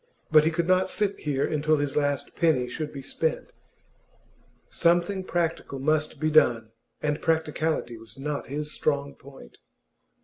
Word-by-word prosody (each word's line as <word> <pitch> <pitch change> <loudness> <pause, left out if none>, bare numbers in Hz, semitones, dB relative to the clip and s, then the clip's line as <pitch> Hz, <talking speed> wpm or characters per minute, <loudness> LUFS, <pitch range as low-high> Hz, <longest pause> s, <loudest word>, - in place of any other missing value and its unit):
But 155 -1 +7
he - - +4
could 165 +1 -1
not 185 0 +3
sit 205 -2 -1
here 140 -2 0
until 155 0 +1
his 145 -1 -2
last 145 -2 -1
penny 150 -7 +2
should 150 +4 -5
be 135 -2 -8
spent. 160 +3 -2 1.1
Something 175 +3 +1
practical 165 -6 -2
must 155 +2 0
be 155 +1 0
done, 115 -7 +4 0.3
and 150 -1 -1
practicality 160 -6 -1
was 110 +1 -14
not 145 +1 -4
his 150 +2 -4
strong 140 -2 -1
point. 135 - -15
150 Hz, 145 wpm, -26 LUFS, 140-160 Hz, 1.1 s, But